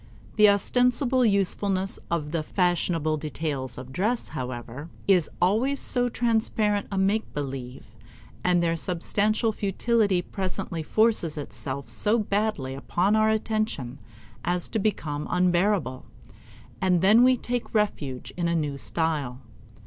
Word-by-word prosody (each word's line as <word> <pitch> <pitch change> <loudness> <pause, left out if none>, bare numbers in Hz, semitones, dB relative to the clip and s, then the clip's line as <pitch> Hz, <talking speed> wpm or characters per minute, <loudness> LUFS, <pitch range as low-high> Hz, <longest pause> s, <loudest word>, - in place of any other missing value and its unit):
The 210 0 +7
ostensible 250 +5 +2
usefulness 195 -2 +1
of 155 -3 -2
the 165 -1 0
fashionable 165 -2 0
details 145 -4 -4
of 130 +1 -9
dress, 220 - -1
however, 125 +4 -6 0.2
is 180 -5 +4
always 230 +10 +2
so 245 -1 +2
transparent 220 -3 0
a 195 - -2
make 200 +3 +1
believe, 130 -5 -6 0.5
and 175 -1 +3
their 165 0 +1
substantial 205 +6 0
futility 205 -2 +1
presently 185 -3 -4
forces 210 -3 +1
itself 140 -1 -5
so 215 +2 +2
baldly 205 - -1
upon 180 +9 0
our 215 0 +3
attention 215 - -1 0.4
as 175 0 0
to 220 - -1
become 155 -8 -2
unbearable, 180 - +1 0.8
and 180 -2 +3
then 210 +5 +6
we 255 0 +5
take 245 0 -3
refuge 145 -12 -1
in 175 -1 -1
a 170 - +1
new 145 -3 -2
style. 150 -7 -2
185 Hz, 125 wpm, -26 LUFS, 150-215 Hz, 0.8 s, The